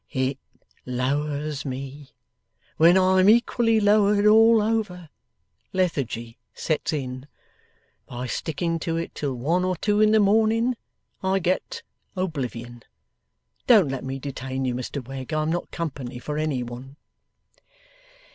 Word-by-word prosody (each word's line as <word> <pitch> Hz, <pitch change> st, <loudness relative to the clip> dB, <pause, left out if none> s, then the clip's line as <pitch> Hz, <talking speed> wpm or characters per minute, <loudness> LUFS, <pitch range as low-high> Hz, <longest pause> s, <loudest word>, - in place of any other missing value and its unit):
'It 130 Hz, -1 st, -1 dB, 0.4 s
lowers 145 Hz, +3 st, -2 dB
me. 135 Hz, +1 st, -7 dB, 0.7 s
When 170 Hz, +3 st, +6 dB
I'm 185 Hz, +1 st, +4 dB
equally 230 Hz, 0 st, +3 dB
lowered 205 Hz, 0 st, +3 dB
all 225 Hz, +1 st, +6 dB
over, 210 Hz, -6 st, -2 dB, 0.6 s
lethargy 130 Hz, -11 st, -2 dB, 0.2 s
sets 155 Hz, 0 st, -1 dB
in. 130 Hz, -3 st, -5 dB, 0.8 s
By 125 Hz, +1 st, -6 dB
sticking 165 Hz, +6 st, -2 dB
to 165 Hz, 0 st, -2 dB
it 165 Hz, -, -4 dB
till 140 Hz, -3 st, -3 dB
one 165 Hz, +9 st, 0 dB
or 185 Hz, 0 st, 0 dB
two 205 Hz, +5 st, +1 dB
in 215 Hz, -, +5 dB
the 220 Hz, 0 st, +4 dB
morning, 225 Hz, +4 st, +3 dB, 0.5 s
I 190 Hz, 0 st, +1 dB
get 195 Hz, -, -2 dB, 0.3 s
oblivion. 125 Hz, -, -4 dB, 0.9 s
Don't 210 Hz, -, +6 dB
let 135 Hz, -1 st, -4 dB
me 135 Hz, +1 st, -4 dB
detain 135 Hz, -1 st, -4 dB
you, 125 Hz, -, 0 dB
Mr 125 Hz, +1 st, -5 dB
Wegg. 135 Hz, +1 st, -6 dB
I'm 155 Hz, +1 st, 0 dB
not 175 Hz, -, -3 dB
company 135 Hz, -7 st, -5 dB
for 150 Hz, +4 st, -4 dB
any 150 Hz, -5 st, -1 dB
one. 125 Hz, +3 st, -9 dB
155 Hz, 130 wpm, -24 LUFS, 130-195 Hz, 0.9 s, When